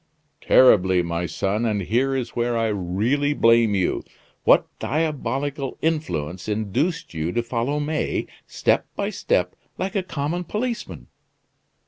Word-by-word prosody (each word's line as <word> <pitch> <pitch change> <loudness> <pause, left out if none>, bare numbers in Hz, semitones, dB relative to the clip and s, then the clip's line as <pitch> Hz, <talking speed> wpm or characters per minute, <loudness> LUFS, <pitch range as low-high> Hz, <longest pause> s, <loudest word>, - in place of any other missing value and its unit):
"Terribly, 95 -8 +5
my 85 +1 -2
son; 100 +6 -1
and 105 -4 0
here 130 +7 +1
is 125 -3 -2
where 120 0 -1
I 115 -1 +1
really 105 +10 0
blame 115 -3 +4
you. 95 -2 0 0.4
What - - +6
diabolical 145 -2 -2
influence 95 - -2
induced 110 - -1
you 80 +1 -2
to 120 - 0
follow 120 +5 -1
May, 150 +1 -1 0.2
step - - +1
by - - -2
step, - - 0 0.2
like 195 +3 -3
a 195 - +2
common 165 0 -3
policeman?" 230 +5 -4
120 Hz, 130 wpm, -23 LUFS, 100-145 Hz, 0.4 s, What